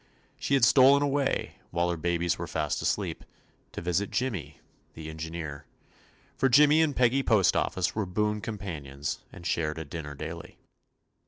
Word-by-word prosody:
She 140 - +1
had 130 -4 +5
stolen 135 +4 +6
away, 145 0 +1
18 - - +3
TOMMY - - -6
POSTOFFICE - - -33
while 85 +1 +1
her 85 - -3
babies 85 +1 0
were 85 - -4
fast 75 -2 -2
asleep, - - -2 0.5
to - - -6
visit 90 +3 0
Jimmy, 95 - -3 0.4
the 80 0 -7
engineer; 80 -2 -6 0.7
for 135 - +2
Jimmy 150 +5 +6
and 150 -4 +1
Peggy 125 +2 +3
Postoffice 95 -5 +2
were 105 -3 -2
boon 105 +3 -1
com 110 0 -5
panions, 75 -7 -5
and 85 - -12
shared 80 -2 -1
a 80 - -5
dinner 75 -1 -7
daily. 80 +3 -8
90 Hz, 170 wpm, -28 LUFS, 80-120 Hz, 0.7 s, stolen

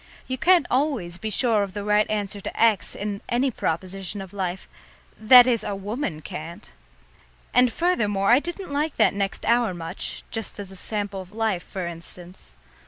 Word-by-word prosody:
You 260 - -1
can't 350 +2 +4
always 250 - 0
be 220 - -3
sure 220 0 +2
of 200 -1 -4
the 205 - -3
right 210 +1 +2
answer 205 -1 -2
to - - -6
X 225 -4 +3
in 200 -1 -4
any 255 +3 +1
proposition 190 +1 -3
of 190 -1 -9
life; 190 -2 -3 0.5
that 245 +3 +8
is, 235 -4 +1
a 205 -1 -3
woman 195 - -4
can't! 165 +3 -8 0.8
And, 250 -1 +5
furthermore, 215 - +1
I 245 - +7
didn't 345 0 -6
like 300 +2 -1
that 220 - +4
next 195 -1 -2
hour 230 -4 +2
much, 165 +2 -5
just 225 -2 -4
as 195 -2 -7
a - - -10
sample 200 0 -3
of 185 0 -13
life, 215 -4 -1
for 190 -3 -5
instance. 170 - -8
205 Hz, 175 wpm, -24 LUFS, 190-240 Hz, 0.8 s, that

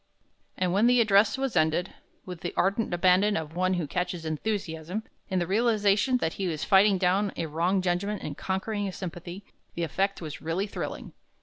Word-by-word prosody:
And 180 -1 0
when 210 +5 +4
the 245 0 +5
address 210 +1 +4
was 270 -2 -2
ended, 160 +4 +1 0.3
with 180 -3 -8
the 175 - -5
ardent 200 +4 +1
abandon 185 +4 +3
of 160 0 -5
one 185 +1 +1
who 175 -3 -1
catches 180 +2 -3
enthusiasm, 165 +2 -3 0.3
in 190 - 0
the 175 - +1
realization 215 +3 +2
that 160 -9 -1
he - - 0
is 160 -4 -2
fighting 195 0 +5
down 190 +2 +1
a 165 - -1
wrong 175 +5 0
judgment 190 +4 -1
and 145 - -5
conquering 200 +4 -2
a - - -3
sympathy, 175 +1 -7 0.3
the 170 - -2
effect 195 +5 -1
was 155 -4 -7
really 165 +5 -1
thrilling. 210 - -6
185 Hz, 185 wpm, -27 LUFS, 170-205 Hz, 0.3 s, the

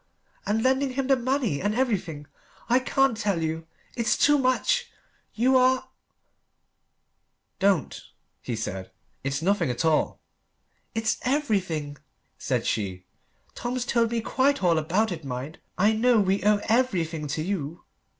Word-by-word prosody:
And 220 +2 +1
lending 265 0 +2
him 270 0 -1
the 270 +1 +4
money 250 - -1
and 205 +2 0
everything. 190 - -1 0.4
I 245 +2 +5
can't 270 -1 +2
tell 200 -6 -1
you 160 +1 -3 0.3
It's 235 -2 +1
too 295 0 +4
much 475 - +1 0.5
You 255 +4 +3
are 260 0 +3 0.8
" - - -50
"Don't," 185 -6 -1 0.4
he 120 - -4
said; 95 -4 -5 0.3
"it's 140 +3 -2
nothing 200 -5 +2
at 125 +5 -1
all." 160 -1 +1 0.8
"It's 225 0 0
everything," 190 - -1 0.4
said - - -1
she. 95 -4 -2 0.5
"Tom's 245 0 -3
told 235 -2 +2
me 235 0 -1
quite 270 +1 +1
all 170 -3 +4
about 185 +8 +1
it, 165 -3 -5
mind! 135 +3 -6 0.2
I 205 +4 +4
know 235 +1 +3
we 195 0 +1
owe 210 0 +3
everything 175 -11 0
to 155 +2 -2
you." 170 -4 -4
210 Hz, 140 wpm, -26 LUFS, 160-255 Hz, 0.8 s, I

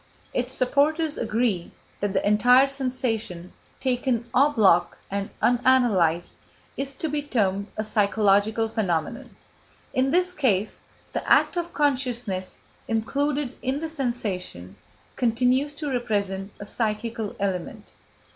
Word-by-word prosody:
Its 250 +1 -1
supporters 295 +4 +2
agree 220 -6 -1 0.3
that 205 -1 -1
the 200 - 0
entire 245 +6 +5
sensation, 245 -9 -3 0.3
taken 250 -2 0
en 280 +4 +5
bloc 195 -9 +3
and 200 0 -2
unanalysed, 235 -10 +3 0.4
is 275 0 -2
to 320 - -3
be 295 -1 -1
termed 200 -8 0
a 215 - -1
psychological 210 +1 +2
phenomenon. 215 - -2 0.6
In 260 +1 +2
this 360 +4 +2
case, 220 - 0 0.3
the - - -3
act - - +5
of 345 0 -3
consciousness, 245 - -1 0.3
included 275 +4 -1
in 265 +2 -1
the 325 +1 -4
sensation, 205 - -4 0.4
continues 255 +4 +1
to 295 0 -5
represent 200 -6 -1
a 205 - -7
psychical 220 0 -3
element. 190 -3 -3
235 Hz, 120 wpm, -25 LUFS, 200-270 Hz, 0.6 s, entire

